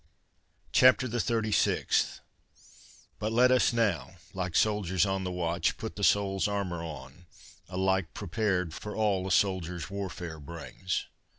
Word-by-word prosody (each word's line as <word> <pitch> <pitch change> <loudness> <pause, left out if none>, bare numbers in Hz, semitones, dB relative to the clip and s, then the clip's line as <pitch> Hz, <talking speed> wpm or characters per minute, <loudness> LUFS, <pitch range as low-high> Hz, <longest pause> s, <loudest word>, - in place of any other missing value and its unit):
CHAPTER 130 0 +5
THE 120 0 -2
THIRTY 110 -2 0
SIXTH. - - +1 1.0
But 110 +1 -2
let 125 +3 +5
us 130 -2 +4
now, 100 - 0 0.2
like 90 -3 -3
soldiers 100 -3 +2
on 95 -1 -1
the 90 - -3
watch, 85 -1 -1
Put 110 - -6
the 100 - -5
soul's 100 -1 +3
armour 100 -4 -2
on, 75 +1 -9 0.4
alike 95 -1 0
prepared 95 -3 -1
For 105 +4 -7
all 100 -4 +1
a - - -3
soldier's 90 -2 0
warfare 90 -5 -5
brings. 85 +4 -4
95 Hz, 135 wpm, -29 LUFS, 85-105 Hz, 1.0 s, CHAPTER